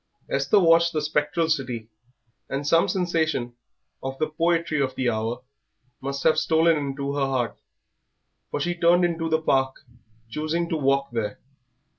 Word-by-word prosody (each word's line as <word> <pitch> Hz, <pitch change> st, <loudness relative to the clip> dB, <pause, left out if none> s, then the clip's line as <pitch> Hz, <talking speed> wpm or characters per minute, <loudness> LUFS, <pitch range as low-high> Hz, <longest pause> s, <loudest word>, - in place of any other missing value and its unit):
Esther 140 Hz, +8 st, +3 dB
watched 170 Hz, -1 st, +4 dB
the 155 Hz, -, 0 dB
spectral 150 Hz, +2 st, 0 dB
city, 125 Hz, -8 st, -2 dB, 0.6 s
and 140 Hz, +1 st, -3 dB
some 165 Hz, +3 st, +4 dB
sensation 160 Hz, -9 st, 0 dB, 0.5 s
of 135 Hz, 0 st, -5 dB
the 155 Hz, -, 0 dB
poetry 165 Hz, -1 st, +1 dB
of 130 Hz, -1 st, -1 dB
the 130 Hz, -, -1 dB
hour 115 Hz, +2 st, -2 dB, 0.6 s
must 140 Hz, 0 st, -4 dB
have 160 Hz, -, +4 dB
stolen 165 Hz, +1 st, +3 dB
into 140 Hz, -1 st, -3 dB
her 140 Hz, -1 st, +1 dB
heart, 130 Hz, -3 st, -2 dB, 0.9 s
for -, -, -3 dB
she 175 Hz, +5 st, 0 dB
turned 175 Hz, +1 st, +4 dB
into 165 Hz, -1 st, -1 dB
the 160 Hz, 0 st, +2 dB
Park, 135 Hz, -4 st, +1 dB, 0.5 s
choosing 155 Hz, +7 st, -2 dB
to -, -, 0 dB
walk 140 Hz, -2 st, +1 dB
there. 110 Hz, -3 st, -3 dB
150 Hz, 150 wpm, -25 LUFS, 135-165 Hz, 0.9 s, watched